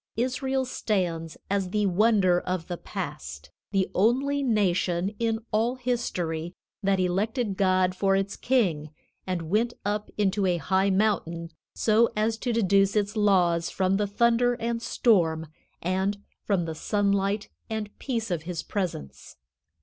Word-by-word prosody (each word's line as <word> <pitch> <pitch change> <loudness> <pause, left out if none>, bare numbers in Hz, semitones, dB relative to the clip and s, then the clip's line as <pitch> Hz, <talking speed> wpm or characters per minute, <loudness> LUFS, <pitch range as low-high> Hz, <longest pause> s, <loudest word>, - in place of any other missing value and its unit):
Israel 260 +2 0
stands 175 -9 -2
as 195 -2 0
the 210 +2 +1
wonder 195 -2 +3
of 180 -2 -3
the 175 - -4
past, 75 - -7 0.2
the 195 -2 +1
only 265 +8 +2
nation 195 -5 +1
in 225 -1 +1
all 230 +4 +1
history 180 -10 -2 0.3
that 195 -1 +2
elected 200 +4 0
God 185 -1 +2
for 195 +1 +2
its 195 +1 -1
king 180 - +1 0.4
and 180 -3 -2
went 235 +4 +1
up 210 +1 -1
into 200 -1 +1
a 175 -1 +2
high 190 +5 +1
mountain 185 -5 0 0.2
so 225 +1 +3
as 220 +1 0
to 245 - -1
deduce 200 -3 +3
its 210 +1 0
laws 180 -5 +3
from 190 0 +1
the 205 0 0
thunder 235 +3 +2
and 235 -1 -2
storm 165 -10 +2 0.4
and 190 +3 0 0.3
from 190 -5 +1
the 165 - -4
sunlight 200 +3 0 0.2
and 215 -2 -4
peace 230 -6 -3
of 170 -3 -1
His 170 0 -5
presence. 75 - -5
200 Hz, 140 wpm, -26 LUFS, 180-225 Hz, 0.4 s, wonder